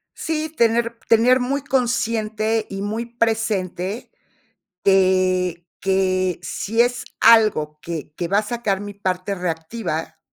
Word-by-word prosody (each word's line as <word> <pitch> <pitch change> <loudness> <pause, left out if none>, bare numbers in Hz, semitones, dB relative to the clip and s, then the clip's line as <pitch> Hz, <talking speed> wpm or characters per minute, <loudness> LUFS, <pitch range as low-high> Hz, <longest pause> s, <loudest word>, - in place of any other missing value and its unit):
Sí, 315 -1 -2
tener 235 0 +2
tener 240 +3 +5
muy 270 +3 -1
consciente, 225 -4 0
y 195 0 -5
muy 220 +3 -3
presente 220 -2 -2 0.7
te 185 -2 +2
que 185 -2 +1
si 225 +8 0
es 245 0 0
algo 155 -10 +4
que 160 -2 -6
que 170 - -3
va 200 +3 +3
a - - +1
sacar 210 -3 -2
mi 205 0 -7
parte 190 0 -2
reactiva, 165 -2 -4
205 Hz, 120 wpm, -21 LUFS, 185-230 Hz, 0.7 s, tener